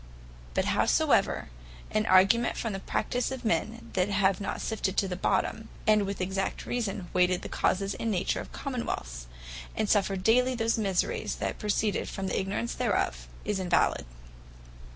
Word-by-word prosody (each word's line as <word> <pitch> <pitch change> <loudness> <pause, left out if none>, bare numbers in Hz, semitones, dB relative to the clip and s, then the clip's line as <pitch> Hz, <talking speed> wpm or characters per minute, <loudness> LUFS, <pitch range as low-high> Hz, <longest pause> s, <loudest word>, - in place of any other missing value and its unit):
But - - +2
howsoever, - - +2 0.4
an 215 0 +1
argument 195 +6 +5
for 230 - -2
the 195 - -4
Practise 245 +5 -1
of 260 -2 -6
men, 225 +1 -1
that 185 +1 +1
have 195 -1 +2
not 200 - -3
sifted 205 -3 -2
to 195 - +3
the 180 - -3
bottom, 220 +4 0 0.2
and 215 -2 +4
with 200 0 -4
exact 190 +1 -2
reason 205 -6 -2
weighed 180 0 +3
the - - -4
causes, 195 +1 0
and 230 - -3
nature 190 -4 0
of - - -10
Common 255 -4 -4
wealths, - - -4 0.5
and 215 - 0
suffer 195 -1 +2
daily 245 +7 +3
those 230 0 +1
miseries, 195 -4 0
that - - -3
proceed 210 0 0
from 195 - -4
the - - 0
ignorance 190 -12 -2
thereof, - - -1 0.2
is 205 -1 -1
invalid. 180 - +1
200 Hz, 165 wpm, -29 LUFS, 185-225 Hz, 0.5 s, argument